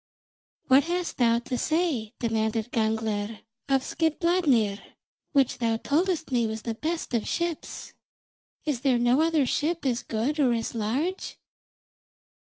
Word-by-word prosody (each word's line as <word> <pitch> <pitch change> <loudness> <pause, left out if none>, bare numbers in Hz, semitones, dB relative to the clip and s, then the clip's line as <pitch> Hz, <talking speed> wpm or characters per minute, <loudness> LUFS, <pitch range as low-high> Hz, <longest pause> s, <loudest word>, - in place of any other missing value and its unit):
44. 260 - +6
"What 280 - +6
hast 360 - -4
thou 235 -1 +4
to 240 +1 -3
say," 310 -10 0
demanded 225 0 -1
Gangler, 220 -2 -1 0.3
"of 270 -1 +3
Skidbladnir, 315 - +1 0.5
which 275 -4 +2
thou 230 -1 +1
toldst 320 +4 0
me 240 -3 +2
was 220 0 -5
the 230 - -2
best 320 +5 -3
of 230 -3 0
ships? 340 -2 -3 0.7
Is 285 -6 -1
there 265 -3 +3
no 240 +4 +3
other 320 -3 +3
ship 315 +5 -1
as 240 -3 +1
good 245 +8 -2
or 255 -4 +4
as 230 -1 -2
large?" 260 - -2
250 Hz, 140 wpm, -27 LUFS, 225-310 Hz, 0.7 s, 44